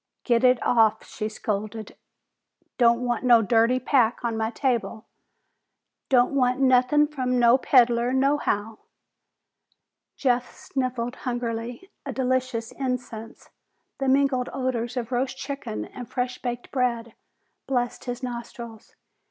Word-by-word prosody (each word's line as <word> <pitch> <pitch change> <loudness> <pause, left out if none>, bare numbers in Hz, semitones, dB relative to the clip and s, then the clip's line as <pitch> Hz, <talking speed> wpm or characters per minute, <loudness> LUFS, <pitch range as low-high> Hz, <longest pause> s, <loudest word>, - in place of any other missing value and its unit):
"Get 235 -1 +2
it 250 0 +5
off!" 220 -2 +3
she 215 -1 -5
scolded. 215 0 -4 0.8
"Don't 235 0 +4
want 240 -1 -1
no 240 -3 +6
dirty 230 +4 +3
pack 250 -3 +2
on 230 -1 -1
my 220 0 -1
table! 235 -3 -2 1.0
Don't 250 0 +4
want 255 -1 +2
nothin' 260 +3 +4
from 255 -4 -2
no 240 +2 +5
peddler 240 -2 +3
nohow!" 260 -6 0 1.4
Jeff 250 -2 0
sniffed 250 -2 -3
hungrily. 240 - -4
A - - -5
delicious 255 -3 -1
incense, 245 -4 -5 0.5
the 270 - -1
mingled 265 -2 +2
odors 255 -2 -2
of 235 0 -3
roast 260 +2 -1
chicken 270 - -5
and 245 - -10
fresh 250 0 -3
baked 240 -1 -5
bread, 235 -3 -1 0.5
blessed 245 -2 -2
his 245 +1 -5
nostrils. 235 -2 -8
245 Hz, 120 wpm, -25 LUFS, 230-255 Hz, 1.4 s, no